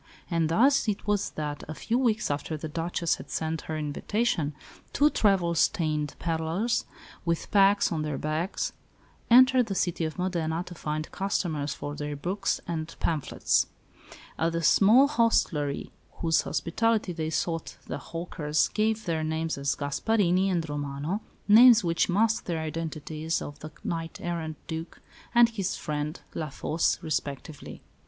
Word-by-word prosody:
And 165 -2 +1
thus 265 +9 +4
it 205 -2 -2
was 205 -1 +1
that, 150 -1 -4
a 155 - -6
few 230 - -1
weeks 230 - +1
after 145 +2 -3
the 160 - -5
Duchess 165 +2 -1
had - - -11
sent 160 0 -2
her 155 - -2
invitation, 155 +1 -1 0.4
two 295 +1 +4
travel 190 -5 +2
stained 155 -4 +1
pedlars, 165 +7 -1 0.4
with 170 -1 -2
packs 200 0 +4
on 160 -2 -1
their 150 -2 -2
backs, 155 +5 -2 0.6
entered 255 0 +6
the 195 - -3
city 175 -2 0
of 155 +2 -3
Modena 170 -2 -1
to 180 - -9
find 155 -1 -4
customers 160 -7 -1
for 145 - -5
their 145 0 -4
books 190 +7 -1
and 160 -2 -3
phamphlets. 155 -5 +1 0.7
At 165 +1 +1
the 165 0 -1
small 225 - +6
hostelry 200 - +1 0.2
whose 165 -2 +2
hospitality 215 +2 0
they 160 -1 -3
sought 165 +1 -2
the - - -5
hawkers 155 -3 -1
gave 220 +1 0
their 160 -2 -1
names 160 +1 -1
as 140 0 -1
Gasparini 185 +5 +1
and 170 -3 0
Romano, 145 +6 -3 0.3
names 230 +1 +8
which 170 +1 +1
masked 220 +4 +2
the 170 -2 -1
identities 160 0 -3
of 145 0 -8
the 155 - -7
knight 165 -1 -3
errant 165 -3 -4
Duc 165 +1 -6 0.4
and 235 -1 +7
his 200 -5 -2
friend, 150 0 -3
La 155 -1 -3
Fosse, 155 +4 0
respectively. 145 -1 -4
165 Hz, 150 wpm, -27 LUFS, 155-200 Hz, 0.7 s, names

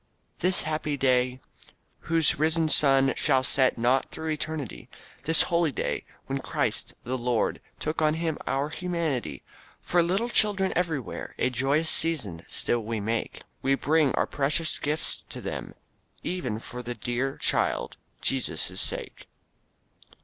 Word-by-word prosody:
"This 185 +1 +2
happy 155 -2 -2
day, 130 -1 +2 0.7
whose 165 -3 +2
risen 160 +1 +2
sun 135 -3 +4
Shall 130 - +2
set 130 -1 +2
not 125 +3 +2
through 160 0 -4
eternity; 155 -4 -4 0.4
This 160 +1 +4
holy 170 -3 +1
day, 120 - -3 0.2
when 135 0 -3
Christ, - - 0
the 130 +2 -3
Lord, 120 -1 0 0.2
Took 155 +1 -2
on 155 0 +3
him 160 -2 -2
our 140 +2 0
humanity; 165 -6 -3 0.4
For 175 - +2
little 190 +8 0
children 200 -4 +2
everywhere 160 - -3
A 130 - +1
joyous 140 +6 +2
season 125 - +2
still 120 - +3
we 110 0 -3
make; 110 +3 -3 0.2
We 135 +1 +2
bring 150 0 +2
our - - +2
precious 150 +3 0
gifts 150 +2 0
to - - -7
them, - - -6 0.5
Even 165 -12 -2
for 125 +2 -8
the 120 0 -5
dear 120 +5 -2
Child, - - 0 0.3
Jesus' 135 -2 +1
sake." - - -3
145 Hz, 140 wpm, -27 LUFS, 125-160 Hz, 0.7 s, sun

